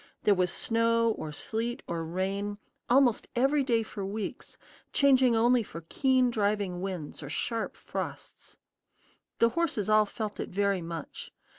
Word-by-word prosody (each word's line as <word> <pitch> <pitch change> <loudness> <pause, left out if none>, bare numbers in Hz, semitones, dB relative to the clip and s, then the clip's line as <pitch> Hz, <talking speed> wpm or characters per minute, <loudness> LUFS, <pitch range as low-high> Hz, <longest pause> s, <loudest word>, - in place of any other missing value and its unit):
There 210 - +5
was 180 -2 +1
snow, 230 0 +2
or 155 -7 -5
sleet, 230 +9 -3
or 170 -1 -3
rain, 195 +4 -2 0.3
almost 250 -2 +4
every 275 +4 +3
day 235 -4 +2
for 210 -2 -7
weeks, 205 +2 -5 0.3
changing 260 -4 +4
only 240 +2 +4
for 165 -6 -9
keen 260 -2 +3
driving 205 -4 0
winds 185 -7 -5
or 145 - -7
sharp 225 +8 -2
frosts. - - -7 0.8
The 230 - +4
horses 235 - 0
all 215 0 +5
felt 215 0 -5
it - - -3
very 200 0 +1
much. 165 -2 -7
215 Hz, 145 wpm, -29 LUFS, 190-240 Hz, 0.8 s, There